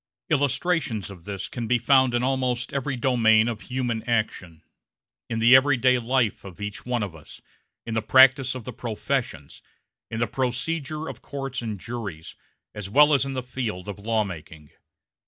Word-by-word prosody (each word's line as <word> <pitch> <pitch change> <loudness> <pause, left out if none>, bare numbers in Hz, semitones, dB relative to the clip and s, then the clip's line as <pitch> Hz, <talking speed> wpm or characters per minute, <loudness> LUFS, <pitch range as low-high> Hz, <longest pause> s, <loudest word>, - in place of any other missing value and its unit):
Illustrations 145 - 0
of 90 -4 -13
this 100 -2 -5
can 120 -3 -5
be 125 - +3
found 130 +1 +3
in 120 - +1
almost 125 -2 -1
every 140 0 -2
domain 115 -3 +3
of 115 -3 -3
human 125 -3 -2
action 95 -8 -2 0.7
in 115 - -2
the 115 +3 +7
everyday 130 -2 +4
life 120 -2 0
of 95 -2 -11
each 105 +3 -6
one 120 -3 0
of 95 -5 -6
us, 80 - -13 0.5
in 115 - -4
the 110 - 0
practice 130 +2 +5
of 125 - -6
the - - -7
professions, 115 - -4 0.5
in 115 - -4
the 115 - +2
procedure 140 +6 -3
of - - -8
courts 135 -3 -5
and 110 -4 -5
juries, 100 -8 -7 0.4
as 105 -2 -6
well 150 +7 +6
as 140 -1 +3
in 135 - -4
the 130 - -3
field 115 -7 -4
of 100 -1 -6
law 110 +1 0
making. 80 -5 -10
120 Hz, 175 wpm, -25 LUFS, 105-130 Hz, 0.7 s, the